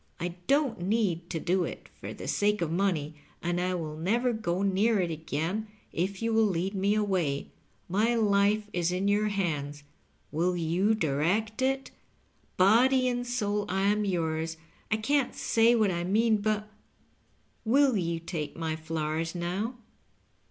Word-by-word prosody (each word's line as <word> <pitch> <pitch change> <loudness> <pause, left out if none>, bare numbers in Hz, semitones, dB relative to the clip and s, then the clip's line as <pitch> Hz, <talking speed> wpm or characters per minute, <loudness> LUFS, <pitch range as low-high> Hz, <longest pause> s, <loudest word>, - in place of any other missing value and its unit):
I 175 - -2 0.2
don't 280 - +2
need 180 -4 0
to 165 - -2
do 180 +3 +1
it - - -6
for - - -6
the - - -8
sake 210 -2 +1
of 160 - -2
money, 165 -5 0 0.3
and 175 +1 0
I 185 0 0
will 155 -3 -4
never 235 +10 +1
go 190 -4 -1
near 200 +3 +2
it 175 -2 0
again 160 +7 -3 0.3
if 190 +5 -2
you 230 0 +1
will 220 -1 +4
lead 190 +1 -1
me 200 +1 +1
away. 185 -10 0 0.4
My 215 +6 +2
life 205 -1 +3
is 175 -1 0
in 185 +2 0
your 205 +1 +2
hands 150 -8 -2 0.2
— - - -36
wiQ 175 +3 +1
you 180 +7 +2
direct 195 - 0
it? 270 +1 0 0.7
Body 255 +7 +5
and 245 0 -1
soul 210 -4 -1
I 190 +1 0
am 210 +1 +2
yours; 160 -4 -1 0.3
I 215 - +2
can't 275 +5 +1
say 230 +1 +3
what 215 -4 +3
I 175 -1 -2
mean, 215 +4 +3
but 210 0 -1 0.5
— - - -25
^will 260 -6 +4
you 165 0 -2
take 165 -3 -5
my 160 -1 -2
flowers 160 +1 -3
now 185 +8 -2
195 Hz, 165 wpm, -29 LUFS, 170-220 Hz, 0.7 s, Body